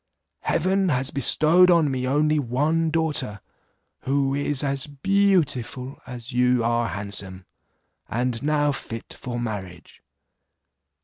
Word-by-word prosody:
Heaven 190 +3 +1
has 135 -1 +1
bestowed 155 +6 +4
on 165 -5 +4
me 130 -1 -2
only 150 +3 +2
one 150 +6 0
daughter, 155 -10 -1 0.6
who 135 0 0
is 145 0 0
as 140 0 0
beautiful 145 - 0
as 125 0 -8
you 125 -1 +2
are 120 0 +1
handsome, 100 -3 -5 0.6
and 120 +1 -2
now 145 0 +1
fit 115 -4 -6
for 120 -1 -5
marriage. 95 -7 -7
135 Hz, 115 wpm, -24 LUFS, 120-155 Hz, 0.6 s, bestowed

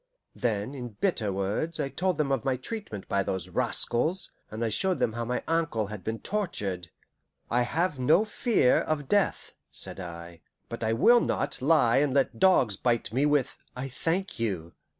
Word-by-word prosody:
Then, 110 +1 -1
in 120 -6 -7
bitter 120 - +1
words, 100 - -2
I 140 - -1
told 185 +4 -1
them 150 -3 0
of 135 -5 0
my 130 -1 0
treatment 135 - -6
by 100 - +1
those 95 -1 -3
rascals, 160 +11 0 0.2
and 110 +2 -3
I - - 0
showed 190 - +1
them 110 - 0
how 120 +1 -3
my 125 +2 -2
ankle 160 -10 0
had 100 -4 -7
been 110 +3 -2
tortured. 100 - -3 0.6
"I 120 +1 +3
have 155 +4 0
no 155 - +4
fear 215 - +2
of 145 -3 -2
death," 205 +3 +1 0.2
said - - -4
I, 85 -1 -8 0.3
"but 115 0 -5
I 110 - +1
will 235 - +6
not 140 -1 -1
lie 135 -5 +4
and 140 -1 +2
let 135 - +1
dogs 135 - +4
bite 120 -3 0
me 140 +4 +3
with 145 -3 0
'I 130 +2 -4
thank 165 +6 -2
you. 95 -7 -2
125 Hz, 180 wpm, -28 LUFS, 110-165 Hz, 0.6 s, will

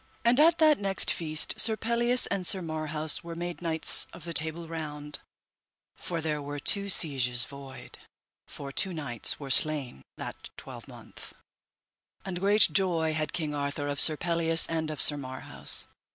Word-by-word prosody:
And 240 +3 +3
at 325 +2 +4
that 310 -2 +3
next 195 -2 +1
feast 155 -2 -3
Sir 220 -1 +3
Pelleas 235 +2 +3
and 190 -3 -2
Sir 190 -2 +2
Marhaus 155 -1 -2
were 170 0 -9
made 175 +1 -7
knights 160 -2 +1
of 175 - -13
the 170 0 -6
Table 160 +3 +1
Round, 150 -2 -6 0.8
for 170 -2 -6
there 150 -1 -3
were 145 +1 -7
two 200 +7 +2
sieges 125 -9 +2
void, 140 -2 -12 0.5
for 140 -1 -10
two 185 +5 0
knights 125 -8 -3
were 140 -2 -6
slain 140 - 0 0.2
that - - -9
twelvemonth, - - -12 0.9
and 185 -2 -5
great 205 +3 +5
joy 170 -5 0
had 155 -1 -3
King 155 -4 -4
Arthur 145 0 -4
of 145 -1 -1
Sir 155 -2 +5
Pelleas 165 -1 +5
and 160 -1 -4
of 155 - -2
Sir 145 - +2
Marhaus. 130 -2 -3
160 Hz, 160 wpm, -27 LUFS, 145-180 Hz, 0.9 s, great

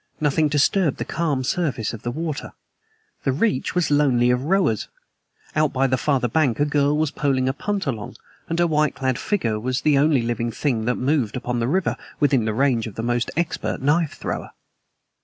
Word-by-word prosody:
Nothing 150 +1 +2
disturbed 150 +2 +2
the - - -3
calm 150 -6 -1
surface 130 - -1
of 110 - -7
the 120 - -3
water. 155 +3 -4 0.7
The 135 - +2
reach 140 - 0
was 180 -4 +1
lonely 130 -4 +3
of 125 +2 0
rowers. 175 - +1 0.7
Out 155 -1 +2
by 135 +1 +2
the 130 -1 +2
farther 130 -1 +1
bank 130 -2 +1
a 145 - +3
girl 145 0 +2
was 155 -1 0
poling 135 -3 0
a 130 - +1
punt 200 +6 -2
along, 115 -7 -4 0.3
and 165 - -1
her 175 - +3
white 150 -3 +1
clad 130 -2 -1
figure 115 - -1
was 125 +3 -2
the 145 -2 +3
only 145 -4 +3
living 115 0 -1
thing 115 -3 -1
that 125 +1 +1
moved 130 -4 0
upon 125 -1 -2
the 115 - 0
river 180 +7 0 0.2
within 135 -6 +3
the 110 - 0
range 125 -3 +2
of 105 - -9
the 115 - -4
most 120 0 0
expert 170 -1 -1
knife 150 +3 +1
thrower. - - -5
140 Hz, 195 wpm, -22 LUFS, 120-155 Hz, 0.7 s, lonely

